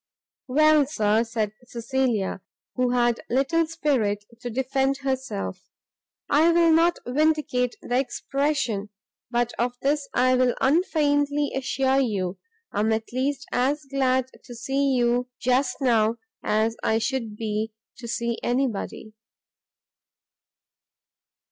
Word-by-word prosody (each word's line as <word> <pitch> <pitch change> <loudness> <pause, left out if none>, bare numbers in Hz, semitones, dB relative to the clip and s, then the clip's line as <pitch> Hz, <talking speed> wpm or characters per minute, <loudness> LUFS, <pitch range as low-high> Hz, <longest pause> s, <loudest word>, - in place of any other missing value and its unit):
"Well, 305 +1 +4
Sir," 220 -5 +2
said 225 -3 -2 0.2
Cecilia, 235 -5 -1 0.3
who 250 -1 +1
had 240 -1 +2
little 295 +6 +2
spirit 255 -11 0
to 245 0 -5
defend 265 +2 0
herself, 260 - -4 0.6
"I 315 +4 +4
will 335 -1 +4
not 335 +2 +4
vindicate 285 -2 +1
the 245 +1 +1
expression, 275 -6 -1 0.4
but 240 0 0
of 245 +1 0
this 285 0 0
I 255 +1 +4
will 255 -1 +3
unfeignedly 290 -2 +2
assure 270 0 +1
you, 195 -8 -1 0.3
I - - -2
am 220 +2 +2
at 220 +1 -2
least 275 +2 -1
as 275 +4 0
glad 260 -1 0
to 245 - -10
see 270 +3 0
you 245 0 +1
just 255 +2 +1
now, 230 -3 +3 0.2
as 220 +1 +1
I 220 - +2
should 230 -2 -2
be 220 0 -2 0.3
to 240 - -7
see 235 0 -2
anybody." 240 -3 -2
255 Hz, 120 wpm, -25 LUFS, 230-275 Hz, 0.6 s, Well